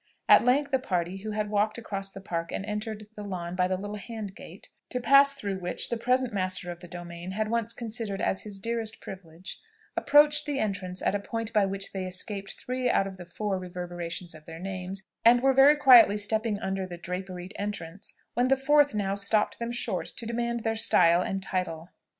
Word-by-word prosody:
At -, -, +8 dB
length 275 Hz, +3 st, +2 dB
a 265 Hz, -, +4 dB
party 180 Hz, -5 st, -2 dB
who 210 Hz, +3 st, -6 dB
had 210 Hz, 0 st, -2 dB
walked 210 Hz, +2 st, +1 dB
across 195 Hz, -4 st, -4 dB
the 195 Hz, 0 st, -10 dB
Park 170 Hz, -3 st, -3 dB
and 195 Hz, -, -3 dB
entered 215 Hz, 0 st, -4 dB
on -, -, -16 dB
the 205 Hz, -1 st, -7 dB
lawn 175 Hz, -2 st, -4 dB
by 180 Hz, 0 st, +2 dB
the 185 Hz, 0 st, -1 dB
little 205 Hz, +2 st, -5 dB
hand 215 Hz, -2 st, -7 dB
gate, -, -, -11 dB, 0.2 s
(to 250 Hz, -, -2 dB
pass 275 Hz, +2 st, +6 dB
through 200 Hz, -6 st, -4 dB
which, 180 Hz, -1 st, 0 dB
the -, -, +1 dB
present 250 Hz, +1 st, +1 dB
master 185 Hz, -2 st, -1 dB
of 175 Hz, -, -9 dB
the 175 Hz, -, -11 dB
domain 175 Hz, +1 st, -7 dB
had 215 Hz, +2 st, -1 dB
once 230 Hz, -1 st, 0 dB
considered 225 Hz, -4 st, -4 dB
as 190 Hz, -, 0 dB
his 205 Hz, -2 st, -8 dB
dearest 225 Hz, +1 st, -2 dB
privilege,) 180 Hz, -2 st, -9 dB, 0.3 s
approached 295 Hz, +1 st, +4 dB
the 290 Hz, -2 st, -1 dB
entrance 190 Hz, -5 st, -3 dB
at -, -, +2 dB
a 205 Hz, -, 0 dB
point 225 Hz, +2 st, -4 dB
by 210 Hz, -3 st, +4 dB
which 195 Hz, 0 st, -3 dB
they 190 Hz, -1 st, -3 dB
escaped 195 Hz, +2 st, -5 dB
three 255 Hz, 0 st, -1 dB
out 195 Hz, -, +3 dB
of 190 Hz, -1 st, -7 dB
the 175 Hz, -1 st, -10 dB
four 195 Hz, +2 st, -2 dB
reverberations 175 Hz, -1 st, -6 dB
of 155 Hz, -1 st, -14 dB
their 165 Hz, 0 st, -9 dB
names, 190 Hz, +1 st, -5 dB, 0.2 s
and 240 Hz, +2 st, +6 dB
were 270 Hz, 0 st, +5 dB
very 275 Hz, +3 st, +7 dB
quietly 250 Hz, -7 st, +8 dB
stepping 215 Hz, +1 st, -1 dB
under 190 Hz, -2 st, -3 dB
the 175 Hz, -1 st, -7 dB
draperied 180 Hz, +1 st, -6 dB
entrance, 200 Hz, -2 st, -6 dB, 0.2 s
when 245 Hz, +1 st, +2 dB
the 270 Hz, +1 st, +4 dB
fourth 290 Hz, -1 st, +4 dB
now 195 Hz, -2 st, 0 dB
stopped 200 Hz, +2 st, +1 dB
them 235 Hz, 0 st, -3 dB
short 240 Hz, -, -3 dB
to 230 Hz, -, -6 dB
demand 235 Hz, +1 st, -2 dB
their 225 Hz, 0 st, -1 dB
style 175 Hz, -5 st, +5 dB
and 195 Hz, +1 st, -2 dB
title. 180 Hz, -3 st, -3 dB
205 Hz, 210 wpm, -28 LUFS, 185-230 Hz, 0.3 s, At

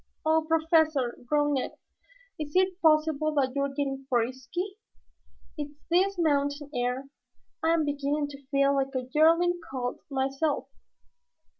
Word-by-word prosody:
"Oh, 315 Hz, 0 st, +2 dB
Professor!" 315 Hz, -6 st, +2 dB
groaned 295 Hz, +1 st, +2 dB
Ned. 265 Hz, -, -1 dB, 0.7 s
"Is 295 Hz, 0 st, -5 dB
it 370 Hz, 0 st, +2 dB
possible 310 Hz, -1 st, +3 dB
that 265 Hz, -3 st, +2 dB
you 280 Hz, -, +1 dB
are 280 Hz, -, 0 dB
getting 270 Hz, -1 st, -3 dB
frisky? 260 Hz, -, -2 dB, 0.8 s
It's 290 Hz, 0 st, -5 dB
this 385 Hz, +3 st, +3 dB
mountain 285 Hz, -2 st, 0 dB
air. 250 Hz, +2 st, -1 dB, 0.5 s
I 325 Hz, +1 st, +3 dB
am 320 Hz, -2 st, +1 dB
beginning 290 Hz, +1 st, -1 dB
to 280 Hz, 0 st, -11 dB
feel 275 Hz, 0 st, +3 dB
like 270 Hz, 0 st, -1 dB
a 255 Hz, -1 st, -2 dB
yearling 335 Hz, +3 st, +4 dB
colt 250 Hz, -2 st, -3 dB
myself." 275 Hz, +2 st, -1 dB
290 Hz, 135 wpm, -28 LUFS, 270-320 Hz, 0.8 s, yearling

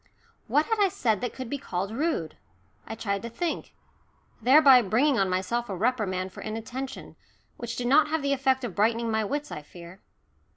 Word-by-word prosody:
What 300 Hz, +1 st, +2 dB
had 450 Hz, -1 st, -1 dB
I 400 Hz, -2 st, +4 dB
said 220 Hz, -, 0 dB
that 245 Hz, -, -2 dB
could 260 Hz, -2 st, -7 dB
be 280 Hz, +4 st, -4 dB
called 195 Hz, -5 st, -3 dB
rude? 230 Hz, -, -2 dB, 0.5 s
I 225 Hz, -, -5 dB
tried 200 Hz, -3 st, -2 dB
to 235 Hz, -, -6 dB
think, 335 Hz, +8 st, -4 dB, 0.7 s
thereby 265 Hz, +1 st, +7 dB
bringing 240 Hz, +6 st, +2 dB
on 195 Hz, -1 st, +2 dB
myself 195 Hz, +6 st, -1 dB
a 195 Hz, -, -3 dB
reprimand 190 Hz, -4 st, -1 dB
for -, -, -9 dB
inattention, 240 Hz, +5 st, -6 dB, 0.4 s
which 235 Hz, -1 st, -5 dB
did 245 Hz, -, -3 dB
not 290 Hz, +5 st, +5 dB
have 310 Hz, -1 st, -1 dB
the 280 Hz, 0 st, +1 dB
effect 265 Hz, -1 st, +1 dB
of 235 Hz, -6 st, -4 dB
brightening 225 Hz, +3 st, +1 dB
my 220 Hz, 0 st, +1 dB
wits, 290 Hz, +7 st, -3 dB
I 150 Hz, -, -5 dB
fear. 170 Hz, +5 st, -13 dB
235 Hz, 190 wpm, -27 LUFS, 200-275 Hz, 0.7 s, thereby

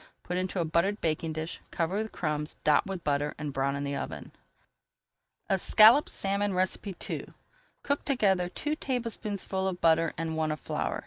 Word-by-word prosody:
Put 180 Hz, -, -3 dB
into 185 Hz, +1 st, -1 dB
a 170 Hz, -, +1 dB
buttered 170 Hz, +6 st, +1 dB
baking 160 Hz, 0 st, -1 dB
dish, 160 Hz, +1 st, -5 dB
cover 170 Hz, +3 st, -1 dB
with 220 Hz, +1 st, -2 dB
crumbs, 150 Hz, -2 st, -3 dB
dot 150 Hz, +3 st, +4 dB
with 190 Hz, -3 st, -5 dB
butter, 145 Hz, 0 st, 0 dB
and 150 Hz, -2 st, -4 dB
brown 135 Hz, +1 st, 0 dB
in 140 Hz, -, -3 dB
the 140 Hz, 0 st, -2 dB
oven. -, -, -5 dB, 1.2 s
ESCALLOPED 215 Hz, +7 st, +6 dB
SALMON 200 Hz, -1 st, -1 dB, 0.5 s
II -, -, -4 dB, 0.6 s
Cook 285 Hz, 0 st, 0 dB
together 195 Hz, -9 st, +2 dB
two 300 Hz, +10 st, -2 dB
tablespoonfuls 210 Hz, -8 st, -2 dB
of -, -, -20 dB
butter 165 Hz, 0 st, +3 dB
and 165 Hz, 0 st, -2 dB
one 160 Hz, -1 st, 0 dB
of 155 Hz, -, -3 dB
flour. -, -, -2 dB
175 Hz, 165 wpm, -29 LUFS, 155-200 Hz, 1.2 s, ESCALLOPED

